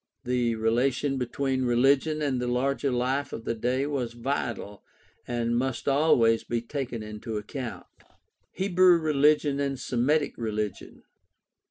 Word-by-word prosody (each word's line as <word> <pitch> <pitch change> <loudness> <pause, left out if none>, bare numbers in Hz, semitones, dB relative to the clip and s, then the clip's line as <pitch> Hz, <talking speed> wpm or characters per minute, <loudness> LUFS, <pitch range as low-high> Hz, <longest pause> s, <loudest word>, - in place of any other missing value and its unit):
The 125 -2 0
rela 115 +4 +2
tion 135 +1 -2
between 130 +1 -1
religion 135 +5 +2
and 130 -4 0
the 125 - -2
larger 135 +3 0
life 130 +3 -1
of 115 - -6
the - - 0
day 125 +4 -1
was 130 -5 -2
vital 120 -5 -4 0.4
and 120 -1 -1
must 130 +1 -2
always 135 -6 +4
be 120 - -2
taken 120 -2 -5
into 105 +1 -6
account. 115 +3 -6 0.7
Hebrew 185 -2 +4
religion 150 -2 +2
and 140 -2 -1
Semitic 140 +5 0
religion. 105 -3 -4
125 Hz, 135 wpm, -27 LUFS, 115-140 Hz, 0.7 s, always